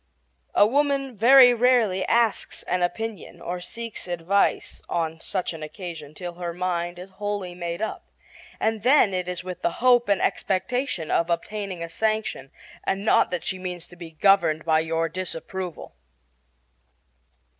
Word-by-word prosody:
A - - +7
woman 275 +1 +1
very 245 +3 +8
rarely 235 -6 +3
asks 230 -2 +1
an 180 - -1
opinion 220 +4 -3
or 175 +1 -5
seeks 230 +1 -7
advice 175 +3 0
on 165 -1 -2
such 185 0 -3
an 160 - -9
occasion 155 -1 -8
till 175 +2 -6
her 170 -1 -5
mind 175 -1 -2
is 185 +2 -10
wholly 205 -2 -4
made 170 +2 -4
up, 220 - -5 0.5
and 220 -1 0
then 250 -4 +5
it 180 -1 -2
is 180 -1 -4
with 185 -1 -7
the - - 0
hope 245 -2 +3
and 200 - +3
expectation 190 - -1
of 170 +1 +2
obtaining 185 +1 -3
a - - -4
sanction, 215 -7 -1 0.3
and 195 +2 -2
not - - +4
that 180 -2 -3
she 185 - -3
means 180 -2 -5
to 175 - -15
be 170 -1 -9
governed 160 -2 +3
by 160 -1 +4
your 165 +1 0
disapproval. 180 +1 -5
185 Hz, 155 wpm, -25 LUFS, 170-220 Hz, 0.5 s, very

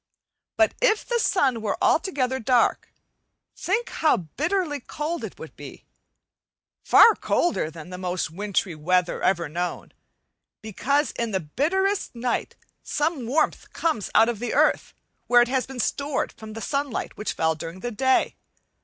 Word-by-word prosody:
But 330 - +4
if 470 -4 +3
the 480 -1 0
sun 265 - +2
were 210 -2 -1
altogether 265 -7 +1
dark, 245 0 +1 0.6
think 440 +6 -1
how 310 -6 +2 0.2
bitterly 310 -1 0
cold 305 +6 -4
it - - -7
would - - -10
be; - - -11 1.0
far 455 - +7
colder 345 - 0
than 165 +2 -11
the 180 - -7
most 180 -2 -2
wintry 195 0 -2
weather 175 +3 0
ever 175 -3 +1
known, 175 +4 -4 0.7
because 275 - 0
in 235 -1 -3
the 190 -3 0
bitterest 345 - -1
night 240 +1 -2 0.3
some 295 -5 -2
warmth 300 +6 0
comes 315 - -1
out 225 - +6
of 235 -3 -2
the 245 - -3
earth, - - +2 0.3
where 240 0 +6
it 240 - -4
has 260 -1 0
been 265 -1 -8
stored 280 +4 -1
from 220 -1 -11
the 225 - -7
sunlight 280 -1 -3
which 210 - -3
fell 160 0 +1
during 165 +3 -8
the 245 - -3
day. 260 +4 +2
245 Hz, 155 wpm, -24 LUFS, 190-300 Hz, 1.0 s, far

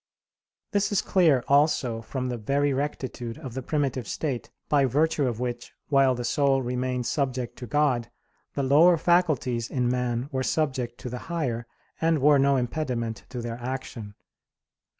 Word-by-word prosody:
This 205 -1 +1
is 205 - +2
clear 160 -10 +3
also 140 -5 +2
from 130 +3 -4
the 120 -1 -3
very 140 +5 +1
rectitude 130 -4 -4
of 130 -4 -8
the 130 - -4
primitive 135 -4 -1
state, 135 -6 -3 0.2
by 140 -2 +3
virtue 145 +2 +1
of 120 -2 -3
which, 120 -1 -4 0.2
while 135 -3 +4
the 120 - -4
soul 135 +1 +2
remained 125 0 -2
subject 130 -4 -2
to 125 - -7
God, 125 -2 +1 0.5
the 140 - 0
lower 160 +6 +6
faculties 150 -10 +1
in 125 -2 0
man 125 0 -1
were 130 -1 -1
subject 130 -5 -1
to 125 - -5
the 125 - -4
higher, 125 -9 -2 0.3
and 165 0 +3
were 145 0 +5
no 140 0 +4
impediment 120 -3 -2
to 125 -2 -5
their 115 0 -5
action. 120 -5 -6
130 Hz, 160 wpm, -26 LUFS, 120-145 Hz, 0.5 s, lower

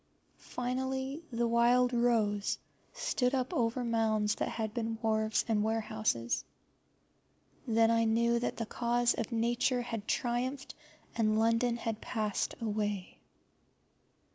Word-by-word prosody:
Finally, 265 +3 -3
the 235 0 0
wild 240 +2 +4
rose 220 -4 +1 0.3
stood 250 +1 0
up 255 -1 -1
over 240 +1 0
mounds 220 -2 +1
that - - -2
had 220 -2 -3
been 225 -1 -2
wharves 220 -1 +1
and 215 -2 +2
warehouses. 215 - -1 1.2
Then 225 0 +4
I 230 0 +3
knew 235 +1 +2
that 240 - -2
the 230 - -2
cause 240 +2 +1
of 225 - -4
Nature 240 +2 +1
had 230 -3 -5
triumphed, 255 +3 -1 0.4
and 215 -1 +2
London 230 +2 +2
had 225 -2 -4
passed 215 -3 -2
away. 210 -4 -3
230 Hz, 120 wpm, -32 LUFS, 220-245 Hz, 1.2 s, wild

